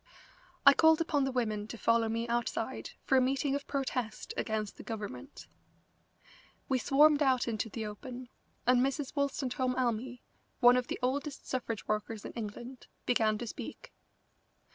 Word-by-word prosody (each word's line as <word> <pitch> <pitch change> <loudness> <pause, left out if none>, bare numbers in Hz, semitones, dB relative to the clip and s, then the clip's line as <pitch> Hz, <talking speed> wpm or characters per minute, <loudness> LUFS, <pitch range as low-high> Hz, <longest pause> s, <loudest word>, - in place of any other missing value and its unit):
I 280 - +10
called 320 +2 +5
upon 295 -4 +1
the 270 - -1
women 215 -4 -1
to 235 - -7
follow 230 0 +2
me 230 +1 -1
outside 235 0 -2
for 265 - +3
a - - +3
meeting 270 +2 +1
of 280 0 -3
protest 255 -5 -3
against 215 -2 -2
the - - -8
government. 205 - -7 1.2
We 260 -1 +1
swarmed 295 +3 +5
out 260 -4 +3
into 225 -1 -2
the 220 +1 -4
open, 245 +4 -7 0.4
and 250 0 +5
Mrs. 275 +1 -1
Wolstenholm 265 -2 0
Elmy, 245 0 -1 0.4
one 245 0 +7
of 250 -1 0
the - - -3
oldest 275 +3 -2
suffrage 240 -4 -3
workers 215 0 -2
in - - -5
England, 235 +3 -7 0.2
began 220 -3 +2
to 240 - -5
speak. 225 - -8
245 Hz, 155 wpm, -31 LUFS, 225-270 Hz, 1.2 s, I